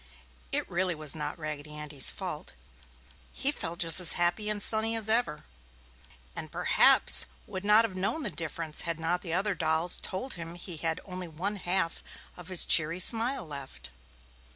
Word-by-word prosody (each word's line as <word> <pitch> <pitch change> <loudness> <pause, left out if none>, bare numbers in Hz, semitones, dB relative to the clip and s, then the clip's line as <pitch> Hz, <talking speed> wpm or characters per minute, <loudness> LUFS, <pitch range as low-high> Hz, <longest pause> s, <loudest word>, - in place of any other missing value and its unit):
It - - -2
really 180 0 -2
was 155 -1 -2
not 150 0 -6
Raggedy 150 -1 -8
Andy's 150 -2 +3
fault. - - -6 0.8
He 280 - 0
felt 170 - -6
just 165 0 +4
as 180 -2 +5
happy 175 +5 0
and 210 -1 -2
sunny 220 +2 +2
as 220 -2 -1
ever. 220 -9 0 0.9
And - - -6
perhaps - - +5 0.2
would 185 - -8
not 210 +2 +5
have 200 -5 -7
known 200 +12 -3
the - - -1
difference 160 -1 -4
had 170 -1 -4
not 170 +2 -2
the 165 -3 -6
other 195 +3 -1
dolls 165 0 -1
told 250 +9 -4
him 170 -1 -8
he 175 -1 -8
had 160 +1 -3
only 185 -2 -7
one 185 +6 -5
half 180 -2 -1 0.3
of 180 -1 -13
his 185 -2 +5
cheery 165 +2 +5
smile 235 +6 +2
left. 140 -3 -9
175 Hz, 170 wpm, -28 LUFS, 160-200 Hz, 0.9 s, as